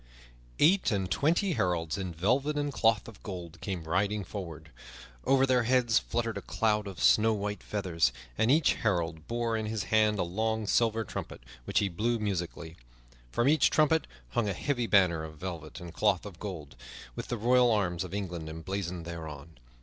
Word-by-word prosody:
Eight 185 +6 +4
and 100 -5 -1
twenty 175 +6 +2
heralds 90 - 0
in 95 -3 -4
velvet 125 - +1
and 145 -1 -1
cloth 115 -4 +2
of 115 - -12
gold 85 -4 -8
came 95 -5 -4
riding 100 +5 0
forward. 80 -5 -8 0.5
Over 135 0 +4
their 130 -2 +3
heads 120 -1 +3
fluttered 115 -1 -2
a - - -11
cloud 105 -2 0
of 95 -3 -8
snow 110 +1 +5
white 105 0 -3
feathers, 85 - 0 0.2
and 110 - +2
each 150 +2 +4
herald 85 -6 -1
bore 120 -1 -1
in 110 -1 -2
his 110 -2 -2
hand 110 -1 +4
a - - +1
long 110 +5 -1
silver 115 +1 +2
trumpet, - - -7 0.2
which - - -2
he 100 - +4
blew 110 +7 0
musically. 85 -5 -4 0.5
From 120 - +1
each 155 +2 +5
trumpet 155 +1 +3 0.2
hung 105 - 0
a - - 0
heavy 120 +4 -1
banner 90 -6 +4
of 80 -1 -9
velvet 85 -3 -6
and 85 -1 -9
cloth 105 -2 +1
of 95 -5 -9
gold, 85 -10 -7 0.4
with - - -5
the 120 - -2
royal 125 +2 +4
arms 95 -6 +1
of 90 - -8
England 90 -5 -4
emblazoned 85 +1 -4
thereon. 80 -3 -8
100 Hz, 180 wpm, -30 LUFS, 85-115 Hz, 0.5 s, snow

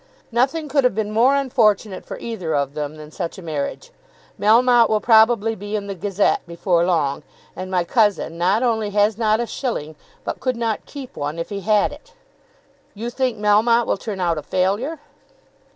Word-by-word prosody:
"Nothing 270 +7 +1
could 280 -1 +1
have 250 -5 +2
been 215 -1 -2
more 240 +6 +4
unfortunate 220 -7 +1
for - - -6
either 185 -9 -4
of 140 -1 -1
them 150 0 -4
than 155 0 -11
such 170 +2 -5
a - - -9
marriage. 160 - -4 0.5
Melmotte 235 +2 +5
will 215 - +2
probably 225 0 +4
be 205 0 -5
in 205 -1 -3
the 200 - -4
'Gazette' 195 +2 0
before 170 0 +1
long, 155 -6 0 0.3
and 185 0 -6
my 180 -2 +1
cousin 205 -4 +1
not 185 +7 +1
only 220 -4 0
has 205 +1 +2
not 215 -1 +2
a 240 - 0
shilling, 190 - -4 0.3
but - - -4
could 255 -1 -1
not 230 -2 -2
keep 275 -3 -9
one 145 +2 -4
if 165 - -4
he 200 - -4
had 210 +1 +2
it." 475 -1 -15 0.8
"You 230 +4 -5
think 255 -2 -1
Melmotte 220 +3 +3
will - - 0
turn 200 -1 -6
out 170 -3 0
a - - -7
failure." 205 - -1
210 Hz, 185 wpm, -21 LUFS, 180-235 Hz, 0.8 s, Melmotte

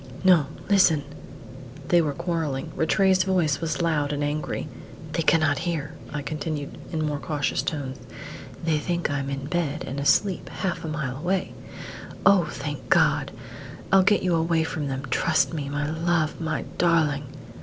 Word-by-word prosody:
"No 175 -7 +5 0.2
listen!" 180 -7 +4 0.9
They 175 -1 +5
were 150 -3 -1
quarrelling. 160 -3 -2
Rattray's 185 +3 +3
voice 175 -7 +1
was 160 0 -1
loud 150 -3 +1
and 145 0 -1
angry. 150 +1 -2 0.4
"They - - 0
cannot 155 -2 +3
hear," 160 -3 -3 0.2
I 150 -1 -4
continued, 150 -1 -4 0.2
in 155 -2 -1
more 145 -1 -2
cautious 145 -1 -1
tones; 135 -4 -4 0.7
"they 160 -2 +2
think 170 -1 -1
I'm 140 -1 -2
in 135 0 -4
bed 160 -1 -1
and 135 +2 -4
asleep 180 +6 +2
half 185 -2 -3
a - - -4
mile 145 -4 -3
away. 180 +5 -1 0.7
Oh, 200 -4 +6
thank 145 -2 -6
God! - - +3 0.6
I'll 195 0 +7
get 200 +2 +3
you 180 -2 +2
away 165 0 +2
from 155 -2 -3
them; 135 0 -3
trust 165 +4 +2
me, 145 -3 -3
my 145 +1 -2
love, 160 0 0
my 160 -1 -1 0.2
darling!" 155 -5 +2
155 Hz, 155 wpm, -25 LUFS, 145-170 Hz, 0.9 s, I'll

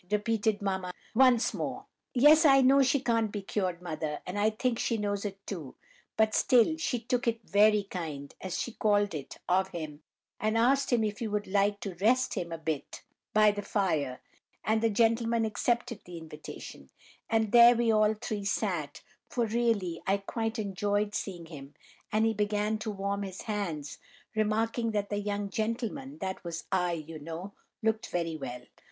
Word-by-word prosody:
repeated 210 0 0
mamma 190 -2 -1 0.2
once 250 -1 +4
more. - - -4 0.3
"Yes, 300 +6 +7
I 270 -3 +7
know 270 +2 +6
she 265 +1 +3
can't 230 -4 +1
be 205 -2 -5
cured, 185 -3 -2
mother, 155 -3 -3
and 185 +3 -4
I 210 +1 +4
think 230 +2 -1
she 230 - 0
knows 205 -1 -2
it 195 -1 -6
too; 160 -10 -6 0.4
but 220 0 +3
still 250 +4 +4
she 275 -6 -1
'took 245 +2 -1
it 230 -1 -1
very 210 0 +5
kind,' 155 -7 -6
as 185 -2 -3
she 240 - -3
called 205 -3 +2
it, 145 -3 -6
of 190 +1 +3
him, 155 -5 -7 0.4
and 215 +1 +1
asked 270 +4 +3
him 235 -2 +3
if 210 -1 -2
he 230 - -2
would 210 0 -2
like 200 +1 +1
to 195 - -4
'rest 235 +9 +2
him' 170 -1 -3
a 165 - -3
bit 160 -3 -4 0.3
by 215 -1 +5
the 205 0 -4
fire, 165 - -1 0.4
and 220 0 +1
the 225 - +3
gentleman 230 +1 +2
accepted 235 +1 -1
the 175 -1 -8
invitation; 150 - -10 0.4
and 220 -2 +1
there 240 +1 +8
we 235 -1 +2
all 215 0 +3
three 215 -1 -4
sat, 185 -8 -2 0.3
for 240 -2 0
really 220 -7 0
I 195 +1 +3
quite 225 +3 -3
enjoyed 205 0 -1
seeing 175 -5 -4
him, 145 -3 -11 0.4
and 215 +1 +3
he 225 - +2
began 210 +1 0
to 215 - -4
warm 200 0 -2
his 190 -2 -6
hands, 170 -9 -4 0.4
remarking 225 +2 0
that 205 -1 -1
the 205 - 0
young 205 -1 -3
gentleman—that 230 0 -3
was 170 -1 -5
I, 180 -2 +1
you 160 -1 -6
know—looked 200 +7 -4
very 165 -2 -2
well. 125 -4 -6
210 Hz, 175 wpm, -30 LUFS, 185-225 Hz, 0.4 s, there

